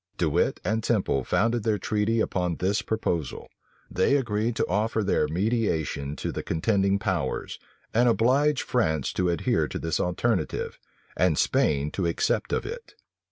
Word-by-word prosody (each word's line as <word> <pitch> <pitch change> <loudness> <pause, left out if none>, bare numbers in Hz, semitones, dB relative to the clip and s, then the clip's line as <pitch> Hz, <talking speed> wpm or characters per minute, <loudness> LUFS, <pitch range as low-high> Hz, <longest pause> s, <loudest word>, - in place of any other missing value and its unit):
De - - +1
Wit - - +1
and 110 +1 0
Temple 95 - +1
founded 115 - +1
their 105 0 +1
treaty 110 +2 0
upon 90 -5 -1
this 100 +5 0
proposal. 85 - -2 0.4
They 95 +9 +2
agreed 115 -2 -1
to - - +1
offer 110 +3 0
their 95 -6 +1
mediation 80 - -1
to - - -3
the - - -4
contending 100 +3 +1
powers, 95 - -2 0.3
and 120 +2 +4
oblige 130 +6 +3
France 80 - 0
to 90 -1 +1
adhere 85 -2 +1
to - - -5
this 80 -1 -2
alternative, 90 0 -1 0.4
and 90 -4 +2
Spain 75 0 +1
to 95 -3 -1
accept 85 - 0
of - - -1
it. 465 0 -8
100 Hz, 155 wpm, -26 LUFS, 85-115 Hz, 0.4 s, and